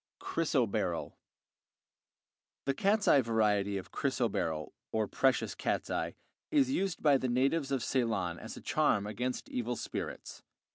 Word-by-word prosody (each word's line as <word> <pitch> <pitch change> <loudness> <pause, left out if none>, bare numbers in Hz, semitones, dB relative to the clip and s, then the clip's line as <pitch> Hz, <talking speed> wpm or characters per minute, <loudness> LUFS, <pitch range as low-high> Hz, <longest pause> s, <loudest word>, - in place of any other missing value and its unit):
Chrysoberyl - - 0 1.5
The 135 - +2
cat's 200 +7 +2
eye 140 - +7
variety 105 -4 +1
of 95 - -7
chrysoberyl, 80 -2 -1 0.2
or 110 -1 +1
precious 130 +4 +2
cat's - - -2
eye, - - -2 0.3
is 280 -4 +3
used 195 - -1
by 145 -3 +6
the 130 - -1
natives 135 +4 +1
of 135 -4 0
Ceylon 110 -10 0
as - - -8
a - - -9
charm 100 - +2
against 125 +4 -3
evil 120 0 -2
spirits. - - -5
125 Hz, 135 wpm, -32 LUFS, 105-140 Hz, 1.5 s, eye